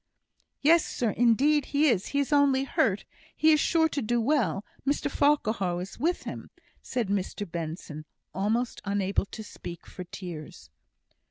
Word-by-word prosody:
"Yes, 325 +3 +5
sir 235 -3 -1
indeed 260 +7 +3
he 295 +2 +2
is; 220 -8 +2
he 280 - -3
is 285 +1 +1
only 280 -2 +4
hurt. 210 -6 +1 0.3
He 315 - +5
is 305 - +5
sure 320 +1 +3
to 285 - -2
do 240 +2 0
well. 225 - +1 0.2
Mr 285 +1 0
Farquhar 220 -13 +1
is 185 +2 -7
with 345 +4 0
him," - - -7 0.3
said 245 -4 -2
Mr 200 +1 -2
Benson, 160 -2 -6 0.3
almost 220 +6 -1
unable 200 0 0
to 220 - -8
speak 170 -5 -9
for 180 - -8
tears. 155 - -9
225 Hz, 155 wpm, -28 LUFS, 190-285 Hz, 0.3 s, Yes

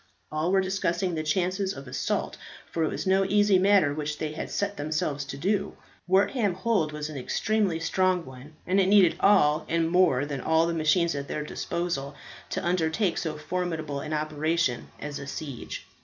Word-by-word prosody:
All 155 +3 0
were 195 0 +4
discussing 185 -1 -1
the 160 - -1
chances 185 +5 0
of 140 0 -9
the 125 - -10
assault, - - -2 0.4
for 165 - 0
it 155 - +1
was - - -4
no 190 +1 +3
easy 205 -1 +4
matter 190 -6 +4
which 150 0 -3
they 155 0 -3
had 155 - -5
set 200 0 -2
themselves 145 -1 -2
to 140 0 -7
do. 195 +6 -1 0.3
Wortham 195 +2 +2
Hold 185 -6 0
was 150 0 -4
an 155 -2 -7
extremely 200 - 0
strong 185 +1 +1
one, 130 +4 -12
and 190 +2 +2
it 190 - +3
needed 195 -3 +5
all 155 -6 +4
and 165 0 +1
more 180 -7 +3
than 140 -3 -4
all 160 +1 +3
the 170 - -1
machines 165 +2 +2
at 140 -1 -4
their 150 - -3
disposal 150 -2 -3 0.3
to 185 0 -3
undertake 175 +2 +1
so 155 -2 -3
formidable 160 -3 -3
an 150 +2 -6
operation 155 -3 0
as 145 -1 -5
a 140 - -7
siege. 140 -3 -6
165 Hz, 185 wpm, -27 LUFS, 150-185 Hz, 0.4 s, needed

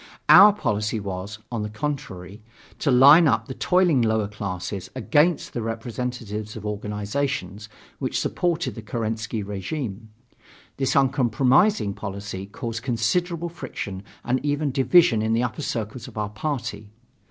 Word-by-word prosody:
Our 210 +1 +10
policy 110 - -1
was, 100 +1 -5
on 115 -2 -2
the 105 - -3
contrary, 105 - -5 0.4
to 145 - 0
line 140 +6 +8
up 115 -4 +2
the 130 - -5
toiling 180 -4 +3
lower 110 -2 +1
classes 95 -2 -5
against 150 +6 +2
the 120 - -3
representatives 115 -2 -4
of 110 -2 -8
organizations 105 0 -3 0.3
which - - -1
supported 175 -1 -1
the 115 - -8
Kerensky 110 -1 -3
regime. 105 - -5 0.7
This 135 -2 0
uncompromising 130 - +3
policy 100 -1 -6
caused 115 +2 -5
considerable 165 +9 -1
friction 125 - -6 0.2
and 125 +2 0
even 145 0 0
division 130 -1 +4
in 110 +1 0
the 115 +2 +2
upper 125 +4 -3
circles 115 -3 -4
of - - -12
our 105 -1 -2
party. 115 -2 -4
115 Hz, 135 wpm, -24 LUFS, 105-140 Hz, 0.7 s, Our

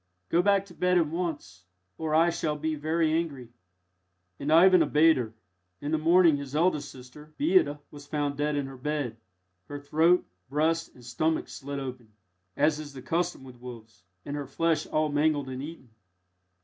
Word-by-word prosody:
Go 170 - +3
back 200 +1 +3
to 190 - -15
bed 180 +2 +2
at 170 - +4
once, 150 - -5 0.4
or 155 -1 -1
I 165 +2 +4
shall 155 -2 -2
be 155 +1 -2
very 155 +1 0
angry." 145 -7 -2 0.9
And 145 +2 -2
Ivan 180 +3 +7
obeyed 160 +1 +4
her. 115 -3 -4 0.4
In 145 - -4
the 160 - +1
morning 165 -1 +5
his 140 0 -7
eldest 155 -3 +1
sister, 150 +4 -14
Beata, 310 - +3
was 145 -1 -12
found 145 -2 -2
dead 150 +1 -1
in 135 -2 -3
bed, 140 -3 -3 0.5
her 145 - -7
throat, 160 +5 +3 0.2
breast, 160 +3 0
and 125 - -15
stomach 155 +7 -1
slit 140 0 -7
open, 125 -4 -7 0.5
as 150 -1 +2
is 145 -2 -8
the 130 -2 -10
custom 170 0 -1
with 125 -2 -13
wolves, 115 -5 -11 0.2
and 145 - -4
her 145 -2 -5
flesh 160 +2 0
all 155 0 0
mangled 145 -1 +1
and 130 0 -5
eaten. 145 -5 -9
150 Hz, 175 wpm, -28 LUFS, 135-165 Hz, 0.9 s, Ivan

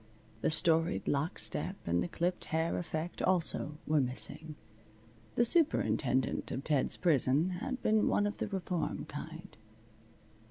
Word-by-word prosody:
The - - +2
storied 165 +2 +2
lock 145 +6 0
step 190 - -3
and 85 +1 +1
the - - -1
clipped 175 +1 -2
hair 160 +1 -1
effect 170 0 -4
also 165 -4 +1
were 155 -1 +2
missing. 150 +4 0 0.8
The 240 - +4
superintendent 135 - +1
of 135 - -4
Ted's 145 -4 +1
prison 155 0 +3
had 260 0 -4
been 215 0 +3
one 205 - +2
of 205 +1 -3
the - - -2
reform 185 -3 -3
kind. 160 +5 -9
165 Hz, 135 wpm, -32 LUFS, 150-185 Hz, 0.8 s, The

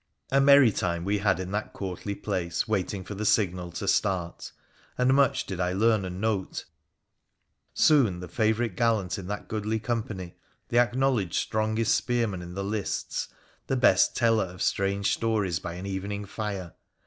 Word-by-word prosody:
A 135 +1 +4
merry 140 -3 +7
time 85 -3 -2
we 100 +1 +1
had 95 -3 +2
in 95 0 -5
that 105 +1 -3
courtly 95 +1 -5
place 85 -5 -2
waiting 100 -2 -1
for 105 - -7
the 105 +2 -4
signal 95 -4 +1
to 100 - -4
start; 95 -3 0 0.5
and 125 +1 +3
much 140 -2 +3
did 95 -3 -5
I 90 0 0
learn 110 0 +2
and 90 0 -5
note 105 -3 -2 0.6
— - - -51 0.3
soon 120 - +4
the 90 - -7
favourite 110 -1 0
gallant 110 -4 +1
in 90 - -8
that 105 +1 -5
goodly 110 0 -2
company, 110 -6 -4 0.4
the 120 - +3
acknowledged 120 -6 +1
strongest 110 +1 +1
spearman 115 -7 0
in 90 0 -8
the 100 - -3
lists, 105 0 -3 0.4
the 135 - 0
best 125 - +4
teller 115 -4 +3
of 90 0 -6
strange 100 +1 +1
stories 105 -7 0
by 85 +1 -6
an 90 +2 -7
evening 100 +1 -4
fire 100 -4 -5
100 Hz, 170 wpm, -27 LUFS, 95-110 Hz, 0.6 s, merry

